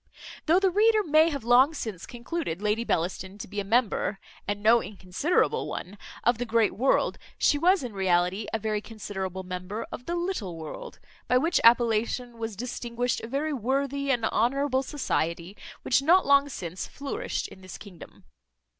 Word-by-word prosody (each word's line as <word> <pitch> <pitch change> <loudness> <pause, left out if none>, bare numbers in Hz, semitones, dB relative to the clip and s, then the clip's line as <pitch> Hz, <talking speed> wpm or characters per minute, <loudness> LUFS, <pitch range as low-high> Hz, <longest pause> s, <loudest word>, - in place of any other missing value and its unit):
Though 340 +4 +5
the 385 -1 +2
reader 430 +2 +4
may 315 -1 +4
have 280 -6 -4
long 255 +6 +5
since 215 - -6
concluded 240 - -4
Lady 210 +2 0
Bellaston 185 0 -2
to - - -7
be 205 - -5
a - - -1
member 215 -1 +1 0.3
(and 205 0 -3
no 230 +2 +6
inconsiderable 200 - -1
one) 190 - -6 0.3
of 240 -1 +2
the 245 - -1
great 225 -1 +2
world; 260 +4 +1 0.2
she 290 - +3
was 365 +1 +3
in 240 -4 -5
reality 190 +1 +1
a - - 0
very 215 -1 -2
considerable 190 -4 -6
member 185 +4 -5
of 245 - -8
the 345 - -1
little 345 - -3
world; 470 - -8 0.3
by 250 - +4
which 330 +7 +2
appellation 235 +1 +3
was 225 -2 -4
distinguished 240 +1 -3
a - - -6
very 290 +5 -2
worthy 275 +3 -1
and 240 -4 +1
honourable 260 +4 +1
society 175 - -2 0.3
which 260 - +3
not 350 +6 +4
long 280 0 +4
since 180 - -6
flourished 420 - -4
in 190 - -14
this 185 -1 -9
kingdom. 190 -5 -13
235 Hz, 170 wpm, -27 LUFS, 200-280 Hz, 0.3 s, no